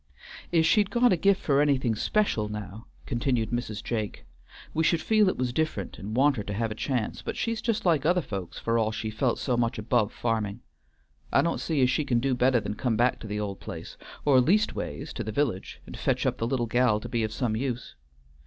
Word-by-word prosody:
"If 165 -2 +4
she'd 205 +4 +4
got 245 -3 +4
a - - +4
gift 195 +3 +2
for 140 -1 +3
anything 135 -5 +2
special, 110 - 0
now," 105 +1 -7 0.2
continued 120 -3 0
Mrs. 120 -3 -3
Jake, 110 -3 -3 0.5
"we 160 - +1
should 165 +1 +3
feel 215 +1 +3
it - - -3
was 125 -1 -1
different 155 -10 -2
and 105 +3 -5
want 140 +1 +4
her 105 - -2
to 100 - -4
have 115 +1 -1
a - - -1
chance, 120 0 -2
but - - -5
she's 230 -1 -1
just 230 -4 -1
like 160 -6 +3
other 175 +3 +3
folks 95 -7 -6
for 115 0 0
all 110 -1 +1
she 110 0 -4
felt 120 +3 0
so 125 - 0
much 120 -1 0
above 110 0 +1
farming. 110 -1 -2 0.7
I - - +4
don't 170 - -1
see 150 -5 +1
as 125 - +4
she 140 +4 +1
can 120 -4 +1
do 135 +2 +1
better 125 0 +3
than 105 -1 -4
come 115 0 -1
back 120 +2 +2
to 110 - -8
the 105 0 -3
old 100 -2 -4
place, - - -8 0.3
or 135 -3 +6
leastways 205 - 0
to - - -4
the 110 - -4
village, 105 -6 -2
and - - -9
fetch - - 0
up - - 0
the 115 - 0
little 120 -1 0
gal 120 -2 +2
to 120 - -7
be 115 -2 0
some 110 +1 -2
use. 125 0 -3
120 Hz, 225 wpm, -27 LUFS, 110-145 Hz, 0.7 s, or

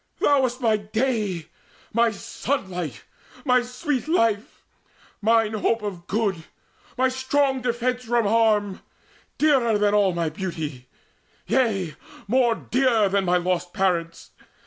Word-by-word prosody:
Thou 285 -2 +4
wast 255 -1 -1
my 220 -3 +3
day, 210 -5 -1 0.5
my 235 +1 +4
sunlight, 185 - -4 0.4
my 250 -2 +4
sweet 255 +3 -3
life, 230 - 0 0.6
Mine 225 0 +3
hope 220 +1 0
of 185 -4 -6
good, 195 -6 -1 0.5
my 260 +1 +3
strong 260 +1 0
defence 250 +1 -1
from 235 -1 +1
harm, 210 -2 +2 0.6
Dearer 260 -8 +3
than 205 0 +2
all 200 -4 +3
my 170 -2 0
beauty 155 -7 -6 0.6
yea, 200 -11 +1 0.3
more 240 +1 +3
dear 235 -6 +2
Than 195 0 +1
my 180 0 +3
lost 180 0 -1
parents! 170 -4 -1
220 Hz, 125 wpm, -24 LUFS, 190-250 Hz, 0.6 s, Thou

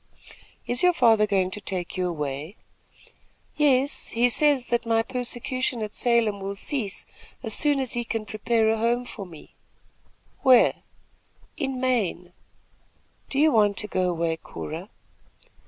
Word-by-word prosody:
"Is 245 +1 -1
your 360 0 +5
father 225 -8 +4
going 190 -2 +1
to 210 - -7
take 185 -3 -4
you 180 -1 -1
away?" 150 +2 -4 1.0
"Yes; 280 -2 +2
he 240 +2 +2
says 285 0 +3
that 240 0 +1
my 225 -1 +1
persecution 250 0 -3
at 210 - -6
Salem 235 -4 +1
will 195 +1 -4
cease 215 -2 -1 0.4
as 220 -3 -1
soon 290 +2 +3
as 260 -3 -2
he 240 - -1
can 225 -2 -4
prepare 220 +2 0
a 225 - 0
home 240 +2 +1
for 200 -5 -8
me." 160 -4 -14 0.9
"Where?" 255 -2 +6 0.8
"In 270 -3 -3
Maine." 205 -9 -1 1.0
"Do 275 - -4
you 310 +2 +5
want 205 -3 +3
to 210 - -2
go 185 -2 0
away, 165 -1 -1
Cora?" 165 +4 -8
225 Hz, 145 wpm, -25 LUFS, 195-255 Hz, 1.0 s, Where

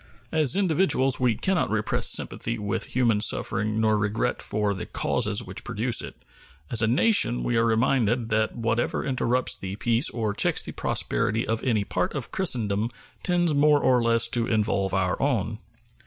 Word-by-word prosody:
As 155 -1 +3
individuals 165 -8 +1
we 125 -3 +2
can 190 - -1
not 180 - 0
repress 105 -1 0
sympathy 115 +1 0
with 100 -2 -3
human 115 -4 +1
suffering 110 +1 0
nor 110 -1 +2
regret 105 +1 -1
for 105 -1 -1
the 95 - -6
causes - - 0
which - - -6
produce - - +1
it; - - -8 0.6
as 115 - +2
a 110 - +2
nation 125 - +2
we 120 - -1
are 115 0 +2
reminded 115 0 +1
that 110 0 0
whatever 115 0 -1
interrupts 130 -1 0
the 95 0 -6
peace 115 +2 +1
or 110 -3 -2
checks - - +1
the - - -6
prosperity 115 0 -1
of 115 0 -2
any 110 -6 +1
part 90 +3 -2
of 135 -5 -5
Christendom 115 - 0 0.3
tends 175 -3 +1
more 145 +1 +4
or 125 -3 +2
less 115 0 +3
to 115 -1 -1
involve 105 -3 0
our 90 -1 -1
own. 115 -6 -1
115 Hz, 170 wpm, -25 LUFS, 105-130 Hz, 0.6 s, more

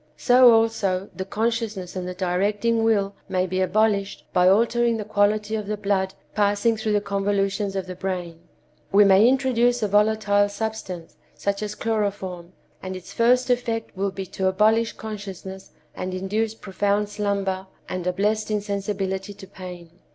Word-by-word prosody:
So, 250 +4 +6
also, 220 -4 +1
the 190 - -4
consciousness 215 -4 -2
and 180 -1 -4
the 180 - -5
directing 205 +5 0
will 205 -3 +2 0.2
may 185 0 +1
be 185 +1 -1
abolished 200 +1 +1
by 180 0 +5
altering 235 +3 +3
the 210 - -5
quality 210 +1 +1
of 215 -2 -2
the 210 0 -2
blood 195 -2 -1 0.2
passing 205 +2 +2
through 220 -1 -1
the 205 - +2
convolutions 200 0 -1
of 190 -1 -2
the 185 - -6
brain. 180 -3 -4 0.5
We 205 +1 +7
may 200 +4 +6
introduce 245 -3 +2
a - - +2
volatile 205 0 +3
substance, 205 -5 -5 0.2
such 200 0 -2
as 210 0 -4
chloroform, 200 -6 -3 0.3
and 185 0 -5
its 185 - -10
first 250 +2 +3
effect 230 -3 -1
will 195 +1 0
be 195 0 -6
to 190 +1 -2
abolish 215 +4 +3
consciousness 195 -3 -8 0.2
and 185 0 -4
induce 210 +4 -1
profound 205 0 -1
slumber 200 -2 -2 0.2
and 180 -1 -4
a - - +3
blessed 210 +4 0
insensibility 200 -1 -2
to 195 - -11
pain. 180 -3 -10
205 Hz, 160 wpm, -24 LUFS, 190-220 Hz, 0.5 s, We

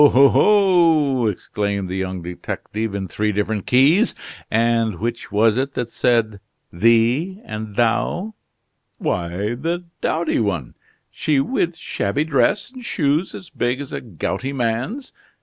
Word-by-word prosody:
oh! 140 -1 +6
oh!" 165 - +4
exclaimed 100 0 -2
the 90 - -4
young 95 -2 -3
detective, 100 +4 -5
in 95 -1 -3
three 105 +3 -1
different 105 0 -2
keys. 150 - +4 0.3
"And 115 -2 +2
which 115 +1 -4
was 110 +2 +3
it 135 +1 -2
that 120 -1 -3
said 110 -4 +1 0.3
'thee' 115 - +2
and 110 -1 -6
'thou'?" 175 - 0 0.6
"Why, 90 +5 -2
the 165 +8 -3 0.2
dowdy 165 0 0
one. 95 - -2 0.4
She 150 -3 +1
with 170 - 0
shabby 120 -2 -2
dress 160 - +1
and 255 -1 -11
shoes 155 -3 0
as 180 - -10
big 125 +2 -1
as 140 -2 -7
a - - -4
gouty 125 - -4
man's. 130 - -2
120 Hz, 135 wpm, -21 LUFS, 105-155 Hz, 0.6 s, oh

